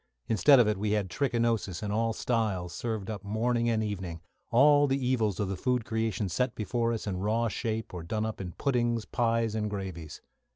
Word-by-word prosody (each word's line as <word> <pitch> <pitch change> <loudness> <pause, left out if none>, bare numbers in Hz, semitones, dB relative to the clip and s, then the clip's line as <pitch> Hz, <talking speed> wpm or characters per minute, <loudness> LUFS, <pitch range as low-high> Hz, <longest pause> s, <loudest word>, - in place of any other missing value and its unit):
Instead 135 +5 +6
of 120 - +5
it 105 -2 0
we 105 0 0
had 100 -4 -1
trichinosis 115 -8 0
in 105 - -2
all 115 +2 +1
styles 105 -7 -1
served 110 -4 -3
up 105 -3 -5
morning 115 +3 0
and 110 -1 +1
evening 95 -5 -4 0.3
all 145 +4 +5
the 135 0 +1
evils 120 -7 0
of 105 - 0
the 95 - -2
food 125 +3 0
creation 110 -4 -1
set 125 +6 -1
before 115 +2 -1
us 115 - -3
in 95 -3 -2
raw 110 +5 +1
shape, 110 -1 -3
or 90 - -5
done 110 +6 -2
up 110 -2 -4
in 90 -2 -6
puddings, 120 -4 0
pies, 115 -2 0
and 105 -1 -1
gravies. 95 -6 -6
110 Hz, 200 wpm, -29 LUFS, 100-120 Hz, 0.3 s, Instead